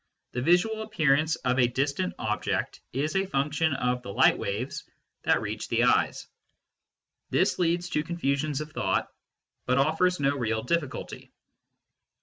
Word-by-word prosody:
the 125 - -3
visual 180 - +2
appearance 160 -7 +2
of 125 -2 0
a 125 - +5
distant 140 +8 -1
object 105 0 -2
is 145 +6 -2
a 195 0 +1
function 150 +1 0
of 125 -1 0
the 110 - -7
light - - +5
waves 105 +7 -4 0.4
that - - +4
reach - - -4
the - - +1
eyes. - - +2 1.0
This - - +1
leads 175 0 +1
to 150 - 0
confusions 150 -3 -1
of 155 0 -7
thought, - - 0 0.6
but 125 0 +2
offers 160 +6 +2
no 140 0 +2
real 110 -4 -1
difficulty. 145 0 -3
145 Hz, 140 wpm, -27 LUFS, 125-170 Hz, 1.0 s, a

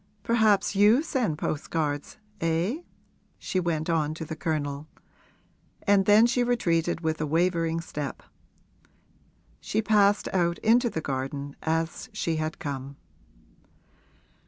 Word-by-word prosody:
'Perhaps 220 -4 +2
you 210 +8 +5
send 245 - -1
postcards, 150 -1 -3 0.2
eh?' 170 - 0 0.6
she 185 - -2
went 165 -3 -1
on 155 -2 0
to 160 - -6
the 160 - -6
Colonel; 150 -2 -3 1.0
and 200 -1 +3
then 210 +2 +7
she 245 +1 +2
retreated 175 -9 0
with 160 -1 -1
a 155 - -1
wavering 165 +1 +1
step. 150 -5 -6 1.4
She - - -2
passed 205 -1 +3
out 170 -2 +1
into 240 +2 +4
the 160 - -4
garden 140 +1 -4
as 165 +8 -2
she 165 -6 -1
had 155 0 -3
come. 140 -1 -5
165 Hz, 120 wpm, -27 LUFS, 155-205 Hz, 1.4 s, then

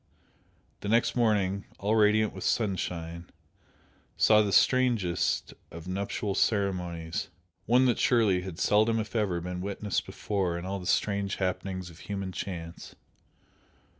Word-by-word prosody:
The 100 - -5
next 115 +2 +2
morning, 100 -5 +1
all 105 +3 0
radiant 110 0 +3
with - - -7
sunshine, 85 -5 -2 0.9
saw 110 -1 +6
the 105 -2 0
strangest 115 -5 +2 0.2
of 85 +1 -10
nuptial 100 +2 -2
ceremonies, 90 -6 -1 0.4
one 125 +3 +5
that 125 - +2
surely 110 -7 +3
had 90 -3 -7
seldom, 110 +4 +3
if 110 +2 -5
ever, 100 -6 +1
been 90 +1 -5
witnessed 100 +1 -2
before 95 -5 -2
in 85 - -6
all 100 +1 -3
the 90 - -7
strange 100 0 0
happenings 95 -1 -3
of 85 - -16
human 100 -2 -4
chance. 85 -2 -7
100 Hz, 135 wpm, -28 LUFS, 90-105 Hz, 0.9 s, saw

